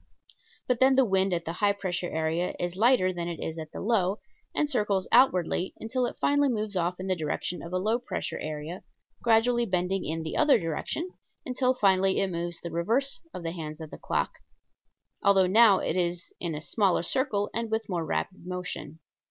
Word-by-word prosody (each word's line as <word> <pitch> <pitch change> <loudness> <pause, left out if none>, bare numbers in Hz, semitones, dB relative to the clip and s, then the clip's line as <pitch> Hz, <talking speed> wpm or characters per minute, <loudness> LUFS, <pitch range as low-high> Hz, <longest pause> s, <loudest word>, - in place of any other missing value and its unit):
[Illustration: - - -32
FIG. - - -27
2.] - - -39
But 250 -2 +2
then 265 0 +5
the 265 -1 +5
wind 190 -2 +2
at 170 0 -4
the 165 - -3
high 200 +3 +2
pressure 185 -3 -3
area 160 +2 -1
is 175 0 -2
lighter 210 -3 +4
than 170 -1 -4
it 170 -1 -5
is 160 0 -4
at 155 -1 -7
the - - -7
low, 200 -3 +1 0.4
and 300 - +2
circles 210 -8 0
outwardly 190 -7 +3
until 245 +3 -1
it - - -7
finally 285 0 +3
moves 215 -4 -2
off 180 0 -1
in 185 - -5
the 190 -1 +1
direction 160 +2 -3
of 170 - -8
a 185 - 0
low 215 +6 +1
pressure 245 - -4
area, 155 +4 -5 0.4
gradually 235 +1 +3
bending 185 0 0
in 160 +1 -3
the 160 - -4
other 300 -2 +5
direction 165 - -3 0.4
until 255 0 +1
finally 190 -3 +3
it 195 -1 0
moves 170 0 -3
the 170 - -6
reverse 230 +12 0
of 180 - -7
the 165 - -2
hands 155 -2 -6
of 160 -2 -9
a - - -6
clock - - -2 0.8
although 195 -2 +5
now 205 +1 +6
it 165 - -1
is 175 -1 -1
in 170 -3 -2
a 150 - -6
smaller 195 -3 +1
circle, 205 - 0
and 230 0 -1
with 220 +1 0
a - - -8
more 170 -2 -1
rapid 80 - -3
motion. 180 -4 -5
185 Hz, 210 wpm, -28 LUFS, 170-225 Hz, 0.8 s, now